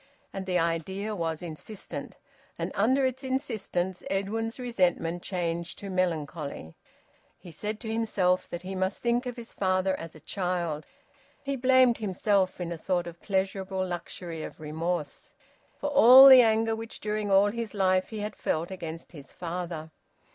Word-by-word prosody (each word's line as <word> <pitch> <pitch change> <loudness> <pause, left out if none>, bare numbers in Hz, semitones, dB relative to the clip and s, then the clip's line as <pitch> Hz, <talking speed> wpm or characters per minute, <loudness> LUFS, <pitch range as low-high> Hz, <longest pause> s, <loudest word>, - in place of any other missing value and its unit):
And 190 -1 -5
the 180 -1 +1
idea 180 +5 -1
was 165 -2 -3
insistent, 175 +5 -8 0.4
and - - -3
under 260 +6 +3
its 260 +1 -2
insistence 215 -9 -2
Edwin's 220 +4 -2
resentment 180 -8 0
changed 170 -2 -3
to 200 -1 -7
melancholy. 155 - -2 0.6
He 175 - -12
said 210 +7 -4
to 220 -1 -4
himself 195 -5 +1
that 175 +1 -6
he 190 +1 -5
must 190 0 -2
think 240 +1 +1
of 245 - -4
his 235 -2 -10
father 185 0 +1
as 165 -1 -8
a - - -12
child. 175 -3 -2 0.6
He 275 0 -2
blamed 255 -2 +4
himself, 195 -2 +1
in 175 -1 -3
a 170 - -5
sort 175 +1 0
of 170 0 -9
pleasurable 190 -1 -1
luxury 175 -2 -6
of - - -8
remorse, 155 0 -4 0.4
for 290 - -3
all 265 -1 +10
the 260 -2 +11
anger 225 -1 +2
which 225 +1 -7
during 210 -1 -2
all 200 +1 +5
his 230 -1 -5
life 185 -1 +2
he 220 -2 -5
had 210 0 -4
felt 165 +4 -2
against 165 -3 -7
his 145 -5 -12
father. 170 -2 -5
190 Hz, 160 wpm, -28 LUFS, 170-220 Hz, 0.6 s, the